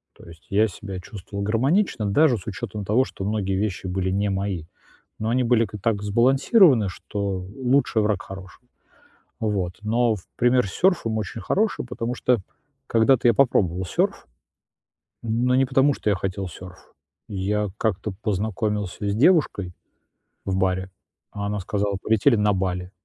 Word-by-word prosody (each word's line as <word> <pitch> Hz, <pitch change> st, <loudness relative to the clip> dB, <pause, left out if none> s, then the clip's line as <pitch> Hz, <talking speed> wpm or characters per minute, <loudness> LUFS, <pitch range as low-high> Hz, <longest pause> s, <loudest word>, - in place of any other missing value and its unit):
То -, -, -16 dB
есть 85 Hz, 0 st, -14 dB
я 105 Hz, +3 st, +3 dB
себя 95 Hz, -1 st, -7 dB
чувствовал 100 Hz, +1 st, -8 dB
гармонично, 120 Hz, -, +1 dB
даже 125 Hz, +4 st, +3 dB
с 90 Hz, -, -12 dB
учётом 105 Hz, 0 st, -5 dB
того, 125 Hz, +6 st, +3 dB
что 95 Hz, -, -8 dB
многие 100 Hz, -2 st, -1 dB
вещи 95 Hz, -2 st, -2 dB
были 95 Hz, 0 st, -1 dB
не 100 Hz, +1 st, 0 dB
мои, 95 Hz, -4 st, -2 dB, 0.5 s
но 110 Hz, +1 st, -1 dB
они 125 Hz, +1 st, +2 dB
были 115 Hz, -1 st, +3 dB
к 105 Hz, +1 st, -8 dB
так 105 Hz, -2 st, 0 dB
сбалансированы, 130 Hz, -, +4 dB
что 100 Hz, +2 st, -5 dB
лучший- 125 Hz, +4 st, 0 dB
враг 105 Hz, -1 st, 0 dB
хорошего. 95 Hz, +3 st, -11 dB, 0.7 s
Вот. 100 Hz, -5 st, -2 dB
Но 115 Hz, +1 st, +2 dB, 0.2 s
пример 125 Hz, -2 st, +3 dB
с -, -, -7 dB
сёрфом 175 Hz, -, +1 dB
очень 110 Hz, +1 st, -4 dB
хороший, 210 Hz, -, 0 dB
потому 120 Hz, 0 st, -4 dB
что 125 Hz, -1 st, +2 dB, 0.5 s
когда-то 120 Hz, +2 st, +3 dB
я 120 Hz, -, +6 dB
попробовал 95 Hz, -8 st, +2 dB
сёрф, -, -, -1 dB, 0.9 s
но 120 Hz, +3 st, +1 dB
не 135 Hz, -, +4 dB
потому, 135 Hz, +2 st, +3 dB
что 110 Hz, -, -2 dB
я 100 Hz, -, +3 dB
хотел 95 Hz, +1 st, -3 dB
сёрф. 90 Hz, +2 st, -12 dB, 0.4 s
Я 105 Hz, +1 st, -1 dB
как-то 105 Hz, -2 st, -1 dB
познакомился 105 Hz, -1 st, -2 dB
с 100 Hz, -, -1 dB
девушкой 115 Hz, -, +2 dB, 0.7 s
в 95 Hz, -1 st, -1 dB
баре, 95 Hz, 0 st, 0 dB, 0.4 s
а 100 Hz, -1 st, -5 dB
она 105 Hz, 0 st, -2 dB
сказала: 100 Hz, +1 st, -1 dB
"Полетели 110 Hz, +3 st, +3 dB
на 105 Hz, -1 st, +2 dB
Бали". 90 Hz, -1 st, -2 dB
105 Hz, 155 wpm, -23 LUFS, 95-120 Hz, 0.9 s, я